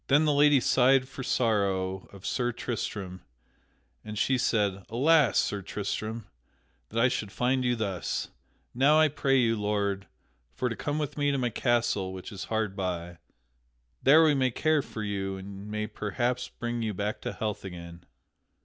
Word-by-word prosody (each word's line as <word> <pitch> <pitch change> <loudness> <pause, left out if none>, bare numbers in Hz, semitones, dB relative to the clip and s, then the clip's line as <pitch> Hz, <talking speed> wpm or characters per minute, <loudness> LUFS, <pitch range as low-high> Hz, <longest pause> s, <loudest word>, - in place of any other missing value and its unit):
Then 145 +3 +4
the 150 - +3
lady 145 -1 +5
sighed 130 +1 +4
for 135 - -8
sorrow 100 -6 0
of 100 -1 -13
Sir 120 -1 0
Tristram, 105 -6 -4 0.8
and 105 0 -7
she 130 - +2
said: 100 -6 +1
"Alas, 140 +1 +4
Sir 100 - +1
Tristram, 110 +3 -4 0.6
that 115 - -2
I 125 - +5
should 105 -5 -3
find 130 +3 +1
you 125 -1 +2
thus! 100 -6 -3 0.4
Now 140 +5 +5
I 155 -1 +5
pray 135 -1 +1
you, 115 -3 +3
lord, 100 -1 -1 0.5
for 125 - -1
to 115 - -4
come 145 0 -3
with 150 -1 -3
me 145 0 +2
to 140 - +1
my 125 -2 0
castle 115 -6 0
which 95 +4 -8
is 100 -2 -6
hard 110 -3 -1
by. 85 -3 -4 0.8
There 155 +4 +7
we 155 -2 +5
may 130 -2 +2
care 155 +5 +2
for 110 -4 -7
you 95 -2 -3
and 100 +1 -9
may 105 0 -2
perhaps 120 +4 -2
bring 120 0 -4
you 110 -3 -2
back 105 +2 -3
to - - -4
health 105 -2 -3
again." 85 -2 -9
115 Hz, 170 wpm, -28 LUFS, 100-130 Hz, 0.8 s, There